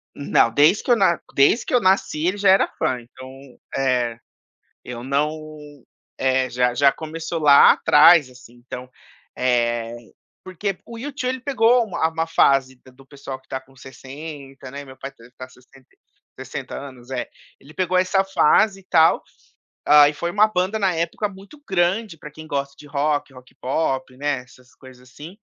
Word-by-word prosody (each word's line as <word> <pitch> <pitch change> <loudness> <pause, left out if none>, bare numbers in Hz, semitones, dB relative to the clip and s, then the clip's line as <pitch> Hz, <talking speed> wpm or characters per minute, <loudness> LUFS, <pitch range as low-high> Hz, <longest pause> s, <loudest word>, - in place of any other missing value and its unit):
Não, 140 -4 +2
desde 150 - +3
que - - -1
eu - - +6
na 190 -6 +2 0.2
desde 140 - +3
que - - -5
eu 250 - +5
nasci 185 -6 +1
ele 185 +3 -1
já 200 -1 +2
era 190 - +5
fã, 125 - -1
então 130 +2 -13 0.4
é! 125 -3 0 0.7
Eu 120 -1 -8
não 145 +4 -1 0.8
é. 130 -1 +1
Já 125 0 0
já 140 +1 +4
começou 165 +2 -6
lá 145 -2 +7
atrás 155 -2 +5
assim, 125 -1 -17
então. 125 +1 -10 0.5
Eh, 120 -2 0 0.5
porque 185 +1 -4
o 235 - -10
U2 275 +2 -6
ele 260 0 -3
pegou 245 -2 +2
uma 185 -6 -2
a 160 - +2
uma 165 0 -2
fase 135 -5 +2
de 130 +1 -20
do 135 +1 -20
pessoal 135 -1 -9
que 130 - -33
tá 130 - -4
com 130 0 -24
60, 135 0 -11
né? 140 +1 -8
Meu 130 -1 -14
pai 135 +2 -8
tá, 125 0 -13
eh, - - -21
sessenta 130 +1 -22 0.5
sessenta - - -7
anos? 130 -2 -11
É. 130 -2 -3 0.3
Ele 150 +3 -17
pegou 185 0 0
essa 190 +1 +2
fase 195 +2 +2
e - - -20
tal, 160 0 +4 0.6
ah, 145 0 +7
e - - -5
foi 170 +4 -4
uma 210 +2 +4
banda 195 +1 -1
na 195 -3 +1
época 170 +6 -2
muito 200 +9 -15
grande 190 +1 0
pra 150 -1 -11
quem 155 +1 -12
gosta 140 -1 -3
de 145 - -14
rock, 145 -1 -1
rock 125 -1 -16
pop 130 -1 -2
né 145 0 -1
essas 125 +1 -22
coisas 130 -1 -16
assim, 160 +9 -12
145 Hz, 180 wpm, -21 LUFS, 130-185 Hz, 0.8 s, lá